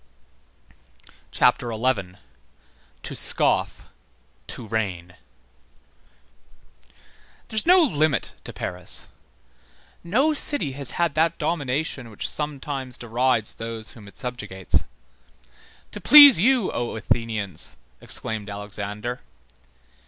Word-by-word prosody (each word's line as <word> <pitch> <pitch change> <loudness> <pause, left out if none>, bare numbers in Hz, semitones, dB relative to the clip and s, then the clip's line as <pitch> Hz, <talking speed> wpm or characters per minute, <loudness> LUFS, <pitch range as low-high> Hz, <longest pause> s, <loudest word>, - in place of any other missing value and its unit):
CHAPTER 125 -1 +2
XI—TO 110 -6 -6
SCOFF, - - 0 0.6
TO 120 - -7
REIGN 95 -6 -3 2.4
There - - -8
is 220 - +1
no 360 0 +7
limit 155 - 0
to - - -6
Paris. 90 0 +2 1.0
No 255 - +2
city 285 - 0
has 135 -1 +1
had 170 -3 +1
that 160 +2 +1
domination 140 -4 -2
which 105 - -4
sometimes 140 -3 -2
derides 120 -1 0
those 115 -1 -7
whom 105 -4 -14
it 100 - -15
subjugates. 105 -7 -3 1.1
To - - -8
please 285 - +9
you, 245 +1 +2
O 120 -1 -3
Athenians! 110 -2 -2 0.3
exclaimed 110 -2 -4
Alexander. 105 +3 -6
125 Hz, 95 wpm, -23 LUFS, 105-155 Hz, 2.4 s, please